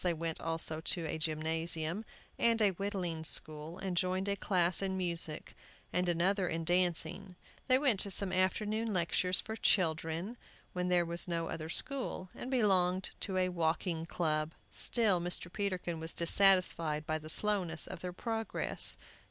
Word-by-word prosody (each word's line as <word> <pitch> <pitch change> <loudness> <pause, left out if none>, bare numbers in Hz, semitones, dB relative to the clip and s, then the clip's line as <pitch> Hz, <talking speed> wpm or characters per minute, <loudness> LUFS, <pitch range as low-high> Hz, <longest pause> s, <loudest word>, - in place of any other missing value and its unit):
They 175 -2 +1
went 165 0 -4
also 165 -1 0
to 170 0 +1
a 160 0 -3
gymnasium, 160 +4 -2 0.3
and 230 -1 +3
a 210 -3 +4
whittling 185 -4 -3
school, 155 +1 +1
and 190 -1 -4
joined 185 +2 0
a 200 - 0
class 180 -3 +1
in 190 -1 -2
music, 170 -4 -3 0.4
and 180 0 +1
another 180 +3 +1
in 165 0 -2
dancing; 175 0 0 0.3
they 255 - +6
went 260 -8 +2
to 200 - +2
some 190 -1 +3
afternoon 210 +4 0
lectures 180 +1 +1
for 220 - -6
children, 165 +2 +1 0.4
when 180 0 -2
there 175 -1 +3
was 170 +2 0
no 165 -1 -2
other 160 -1 -5
school, 240 - -4
and 250 - -7
belonged 190 -7 +2
to 190 -2 -2
a 185 0 +2
walking 165 -1 -1
club. 155 -2 -1 0.2
Still 210 -7 +2
Mr. 175 0 -4
Peterkin 185 -5 -2
was 160 +1 -2
dissatisfied 170 -4 +3
by 155 +1 -2
the 155 0 -10
slowness 185 -3 +2
of - - -8
their 180 +1 -5
progress. 225 +4 -1
180 Hz, 160 wpm, -33 LUFS, 165-195 Hz, 0.4 s, they